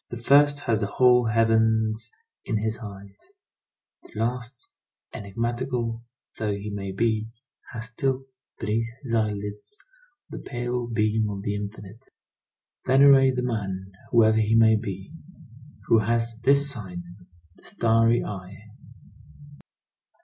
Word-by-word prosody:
The 120 Hz, -, -6 dB
first 145 Hz, +4 st, +4 dB
has 115 Hz, -5 st, 0 dB
the 100 Hz, -, 0 dB
whole 125 Hz, +3 st, +4 dB
heavens 110 Hz, 0 st, +2 dB, 0.3 s
in 110 Hz, -, -1 dB
his 110 Hz, +1 st, -2 dB
eyes; 100 Hz, -, -11 dB, 0.7 s
the -, -, -18 dB
last, 120 Hz, +2 st, -3 dB, 0.5 s
enigmatical 115 Hz, +2 st, -3 dB, 0.4 s
though 105 Hz, -2 st, -1 dB
he 100 Hz, +1 st, -6 dB
may 100 Hz, -1 st, -4 dB
be, 110 Hz, +2 st, 0 dB, 0.4 s
has 115 Hz, -2 st, -6 dB
still, 135 Hz, +2 st, -1 dB, 0.4 s
beneath 115 Hz, +1 st, -1 dB
his 120 Hz, -4 st, -5 dB
eyelids, 105 Hz, -, -2 dB, 0.5 s
the -, -, -8 dB
pale 120 Hz, -1 st, -3 dB
beam 110 Hz, -1 st, 0 dB
of 100 Hz, -1 st, -5 dB
the 100 Hz, -, -1 dB
infinite. 105 Hz, +3 st, -8 dB, 0.8 s
Venerate 135 Hz, 0 st, +6 dB
the 125 Hz, -, -1 dB
man, 95 Hz, -5 st, -3 dB, 0.2 s
whoever 110 Hz, -2 st, +4 dB
he 110 Hz, +1 st, +2 dB
may 110 Hz, -1 st, +6 dB
be, 100 Hz, 0 st, -5 dB, 0.7 s
who 115 Hz, -, +4 dB
has 115 Hz, +1 st, 0 dB
this 140 Hz, +1 st, +5 dB
sign—the 90 Hz, -4 st, -11 dB
starry 115 Hz, +1 st, +2 dB
eye. 95 Hz, -1 st, -7 dB
110 Hz, 120 wpm, -25 LUFS, 105-120 Hz, 0.8 s, Venerate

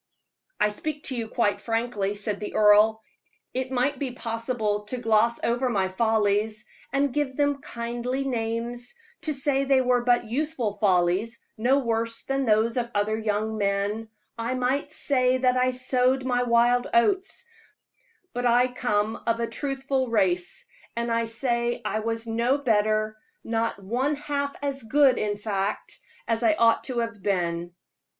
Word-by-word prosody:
"I 210 Hz, -, +3 dB
speak 295 Hz, +8 st, -5 dB
to 260 Hz, -, -3 dB
you 230 Hz, -2 st, -3 dB
quite 220 Hz, -2 st, 0 dB
frankly," 225 Hz, -3 st, -1 dB
said 205 Hz, 0 st, -3 dB
the 210 Hz, -, -6 dB
earl. 215 Hz, +1 st, +5 dB, 0.5 s
"It 260 Hz, 0 st, -2 dB
might 260 Hz, +2 st, 0 dB
be 265 Hz, -3 st, -3 dB
possible 225 Hz, -3 st, -2 dB
to 250 Hz, +5 st, -4 dB
gloss 230 Hz, 0 st, +2 dB
over 245 Hz, +2 st, +1 dB
my 195 Hz, -5 st, 0 dB
follies, 215 Hz, +1 st, +1 dB, 0.3 s
and 275 Hz, -1 st, +1 dB
give 290 Hz, -3 st, -1 dB
them 285 Hz, -1 st, +1 dB
kindly 240 Hz, +3 st, -3 dB
names 240 Hz, -, -3 dB, 0.3 s
to 315 Hz, -, -2 dB
say 275 Hz, -1 st, +1 dB
they 270 Hz, -1 st, +3 dB
were 250 Hz, -1 st, +2 dB
but 240 Hz, -1 st, +3 dB
youthful 250 Hz, -2 st, -2 dB
follies, 190 Hz, +2 st, +1 dB
no 245 Hz, +5 st, +3 dB
worse 230 Hz, -3 st, -1 dB
than 270 Hz, 0 st, -1 dB
those 220 Hz, +2 st, +2 dB
of 240 Hz, -1 st, -1 dB
other 205 Hz, +1 st, +1 dB
young 220 Hz, 0 st, -1 dB
men: 200 Hz, +2 st, -1 dB, 0.3 s
I 235 Hz, +3 st, -1 dB
might 260 Hz, +3 st, -1 dB
say 255 Hz, -4 st, +1 dB
that 255 Hz, -1 st, +2 dB
I 255 Hz, 0 st, +3 dB
sowed 255 Hz, +1 st, +1 dB
my 245 Hz, -1 st, +1 dB
wild 245 Hz, +1 st, +3 dB
oats; 380 Hz, -, +2 dB, 0.9 s
but 245 Hz, 0 st, 0 dB
I 245 Hz, +2 st, +4 dB
come 220 Hz, -3 st, -1 dB
of 230 Hz, 0 st, +1 dB
a 235 Hz, -, +1 dB
truthful 270 Hz, +2 st, -2 dB
race, 180 Hz, -5 st, 0 dB, 0.3 s
and 235 Hz, 0 st, -2 dB
I 230 Hz, 0 st, +1 dB
say 235 Hz, +1 st, -1 dB
I 215 Hz, +1 st, -1 dB
was 225 Hz, +1 st, -3 dB
no 235 Hz, +4 st, +1 dB
better 215 Hz, -4 st, +1 dB, 0.3 s
not 225 Hz, -1 st, -1 dB
one 255 Hz, +9 st, 0 dB
half 285 Hz, -1 st, -3 dB
as 275 Hz, -1 st, -2 dB
good, 265 Hz, +2 st, +4 dB
in 205 Hz, -1 st, -1 dB
fact, 205 Hz, -1 st, -3 dB, 0.3 s
as 230 Hz, 0 st, 0 dB
I 220 Hz, -3 st, +4 dB
ought 230 Hz, +1 st, +3 dB
to 255 Hz, -3 st, -4 dB
have 230 Hz, -3 st, -5 dB
been. 175 Hz, -3 st, -1 dB
235 Hz, 155 wpm, -26 LUFS, 215-255 Hz, 0.9 s, earl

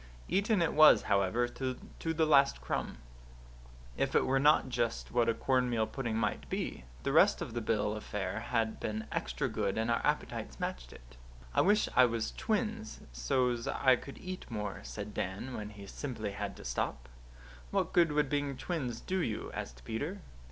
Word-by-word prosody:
Eaten 200 Hz, -1 st, +2 dB
it 165 Hz, -, 0 dB
was, 155 Hz, 0 st, +8 dB
however, 100 Hz, +5 st, +2 dB
to 130 Hz, +1 st, -3 dB, 0.2 s
the 160 Hz, -1 st, +1 dB
last 140 Hz, -3 st, +5 dB
crumb. -, -, -3 dB, 1.0 s
If -, -, -1 dB
it -, -, +4 dB
were 135 Hz, +1 st, +2 dB
not 150 Hz, 0 st, +5 dB
just 120 Hz, -2 st, -2 dB
what 120 Hz, -1 st, +3 dB
a 115 Hz, -, +2 dB
cornmeal 125 Hz, -4 st, +1 dB
pudding 115 Hz, -1 st, -3 dB
might 115 Hz, -, -1 dB
be, -, -, -3 dB, 0.2 s
the -, -, 0 dB
rest -, -, +5 dB
of -, -, -5 dB
the 120 Hz, -, -2 dB
bill 105 Hz, -2 st, 0 dB
of 105 Hz, -, -6 dB
fare 105 Hz, +1 st, -3 dB
had 115 Hz, -1 st, -1 dB
been 110 Hz, 0 st, -3 dB
extra -, -, -1 dB
good 100 Hz, -, -1 dB
and 115 Hz, +1 st, +1 dB
our 115 Hz, -, +1 dB
appetites -, -, -2 dB
matched 60 Hz, 0 st, -4 dB
it. -, -, -15 dB, 0.4 s
"I -, -, +4 dB
wish 210 Hz, +2 st, +4 dB
I 130 Hz, -, +8 dB
was 115 Hz, -2 st, -1 dB
twins 220 Hz, 0 st, -2 dB
so's 120 Hz, -, 0 dB
I 130 Hz, -2 st, +4 dB
could 140 Hz, +2 st, -9 dB
eat 185 Hz, 0 st, -7 dB
more," 105 Hz, -4 st, -4 dB
said 105 Hz, 0 st, -7 dB
Dan, 100 Hz, +8 st, -3 dB
when 105 Hz, -1 st, -5 dB
he 105 Hz, -1 st, -11 dB
simply 110 Hz, -2 st, -4 dB
had 100 Hz, 0 st, -5 dB
to -, -, -11 dB
stop. -, -, -2 dB, 0.6 s
"What -, -, 0 dB
good 170 Hz, -3 st, +5 dB
would 150 Hz, -1 st, +2 dB
being 145 Hz, -1 st, -1 dB
twins 130 Hz, -10 st, -3 dB
do 190 Hz, 0 st, -1 dB
you?" 115 Hz, -11 st, -2 dB
asked -, -, -7 dB
Peter. 150 Hz, -, -3 dB
120 Hz, 180 wpm, -32 LUFS, 105-145 Hz, 1.0 s, was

